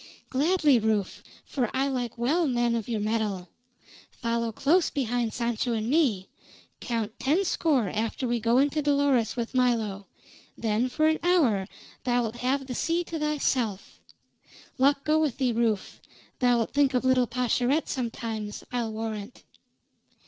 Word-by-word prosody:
"Gladly, 295 -1 +3
Rufe, 215 -3 -1 0.2
for 250 -5 -1
I 270 +1 +2
like 245 -4 -3
well 300 +8 +1
men 240 -2 +1
of 230 0 -3
your 225 -2 -1
mettle. 210 -4 -2 0.6
Follow 230 -1 -2
close 315 - +2
behind 245 -4 -1
Sancho 235 +1 -1
and 225 +2 -2
me. 250 - +2 0.5
Count 225 -3 -3
ten 320 +9 +1
score 290 - +1
after 220 +6 -2
we 240 0 0
go 230 +2 +2
in 280 +2 +3
to 305 - -1
Dolores 280 -5 +2
with 235 -1 -4
Milo, 225 -6 0 0.5
then 225 +3 0
for 310 +5 +1
an 315 0 +2
hour 275 - +2 0.4
thou'lt 240 -2 0
have 265 +3 0
the 255 - -5
sea 335 +7 0
to 330 -1 -5
thyself. 260 -9 -1 0.8
Luck 280 +1 +3
go 310 +1 +2
with 300 -6 0
thee, 260 -3 +1
Rufe; 225 -4 -1 0.4
thou'lt 245 -3 +2
think 280 -2 +3
of 250 - +1
little 255 -1 +3
Pascherette 250 +4 0
sometimes, 225 -4 -4
I'll 240 -3 -2
warrant." 220 +1 -6
245 Hz, 150 wpm, -27 LUFS, 225-280 Hz, 0.8 s, Gladly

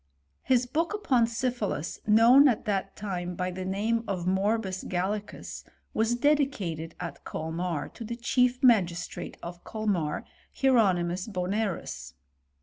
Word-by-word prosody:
His 250 -1 +2
boolC; 325 +10 -1
upon 255 - +2
syphilis, 230 - -2
known 235 +6 +7
at 240 -5 +1
that 195 -2 -1
time 180 -3 -4
by 180 +1 -2
the 185 +1 -5
name 210 +5 0
of 185 -3 -2
Morbus 190 +1 0
Gallicus, 200 +4 -3 0.3
was 225 +2 +2
dedicated 240 - 0
at 175 -1 -6
Colmar, 160 -1 -3
to 235 - -9
the 235 +2 -4
chie| 250 +1 +2
magistrate 180 -8 +2
of 175 0 -8
Colmar, 195 -9 -2 0.3
Hieronymus 190 -9 +3
Bpnerus. 200 0 -3
205 Hz, 125 wpm, -28 LUFS, 180-235 Hz, 0.3 s, known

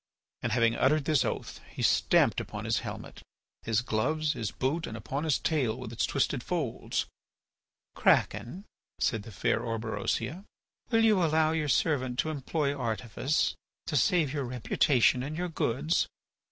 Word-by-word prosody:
And 120 - -2
having 115 -1 +3
uttered 140 +2 +2
this 150 -4 +3
oath - - -4
he - - -5
stamped - - +3
upon - - -7
his - - +1
helmet, - - -8 0.4
his 115 0 +1
gloves, 150 +7 0
his 115 -6 -3
boots, 150 +6 -2
and 110 - -6
upon 135 +7 -4
his 155 - +2
tail 130 -8 0
with 125 -3 -7
its 115 - 0
twisted 140 -2 0
folds. 160 -10 -2 0.9
"Kraken," 180 - +1 0.3
said 115 - +1
the 110 - -11
fair 95 - 0
Orberosia, 115 - -2 0.5
"will 225 -1 +3
you 210 -5 +4
allow 160 -1 +3
your 155 -2 -1
servant 130 -2 +1
to 155 - 0
employ 145 0 -1
artifice 120 +3 -1 0.3
to 155 - -3
save 155 0 +3
your 140 -3 -2
reputation 125 +1 +2
and 150 +4 -4
your 180 0 -2
goods? 155 +1 0
135 Hz, 155 wpm, -29 LUFS, 115-155 Hz, 0.9 s, you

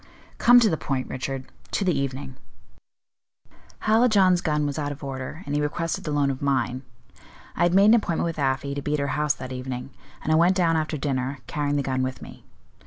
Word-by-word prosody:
"Come 245 +1 +7
to 225 - +4
the 160 - 0
point, 130 -2 -2
Richard 130 0 -4 0.3
to 200 - 0
the 180 - +2
evening." 135 -1 -3 1.5
"Hallijohn's 215 -5 +4
gun 150 -3 0
was 145 +1 -2
out 145 -1 -2
of 145 +1 -9
order, 135 +5 -6
and 145 - -4
he 145 - +1
requested 165 +3 -2
the 150 - -2
loan 145 -1 +2
of 130 - -6
mine. 130 -2 0 0.7
I - - -3
had 175 +1 +3
made 195 +1 +6
an 215 - +7
appointment 200 -9 +1
with 165 -2 -3
Afy 135 0 0
to 140 - -4
be 150 +1 -1
at - - -2
her 140 - -1
house 150 -2 +1
that 130 0 -8
evening, 125 +1 -5 0.3
and 155 - -1
I - - +5
went 175 +3 +4
down 170 -3 +2
after 155 -1 -1
dinner, 135 -1 -2
carrying 145 +2 -1
the 140 - 0
gun 130 -1 -1
with 130 0 -3
me. - - -12
145 Hz, 215 wpm, -25 LUFS, 135-165 Hz, 1.5 s, Come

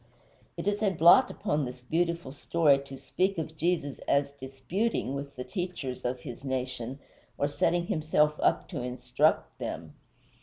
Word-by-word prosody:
It - - -4
is 205 +1 +1
a 210 - +4
blot 180 +9 +6
upon 150 -7 -1
this 125 -1 -6
beautiful 170 +1 -1
story 145 0 +3
to 135 - -8
speak 190 +7 -1
of 160 -1 -4
Jesus 160 -3 -1
as 140 0 +2
"disputing" 135 - -2
with 140 0 -5
the 125 - -5
teachers 175 -9 -4
of 125 0 -2
his 125 0 -8
nation, 130 -1 -3 0.4
or 145 - +1
setting 170 +4 +1
himself 155 -4 +1
up - - +2
to 150 -9 -4
instruct 125 +4 0
them. 80 -2 -5
145 Hz, 155 wpm, -29 LUFS, 130-170 Hz, 0.4 s, blot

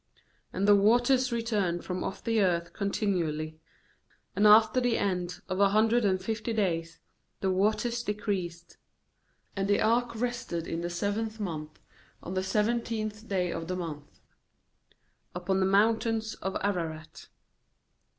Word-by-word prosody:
3And 195 - -1
the 205 0 +7
waters 245 +5 +3
returned 210 -7 -1
from 180 0 -3
off 190 - -5
the 225 -2 +2
earth 170 -3 0
continually; 165 -7 -2 0.8
and 205 +2 +5
after 220 +4 +6
the 245 -2 +1
end 180 -3 -2
of 185 +1 -3
a 200 -1 +5
hundred 220 +3 +3
and 190 -2 +2
fifty 225 +3 -3
days 165 -6 -1 0.4
the 190 - +1
waters 215 +5 +1
decreased. 190 -6 -4 0.8
4And 195 -1 -1
the 205 - +3
ark 235 +2 +1
rested 235 -8 -3
in 165 0 -3
the 175 - -3
seventh 210 +5 -2
month, 155 -6 -5 0.4
on 180 - -5
the 185 - 0
seventeenth 215 +1 -1
day 180 -3 0
of 165 0 -5
the 185 - -2
month, 155 -5 -7 1.1
upon 185 +2 0
the 190 - +2
mountains 220 +2 +2
of 190 0 -4
Ararat. 165 -6 -3
200 Hz, 140 wpm, -29 LUFS, 175-220 Hz, 1.1 s, the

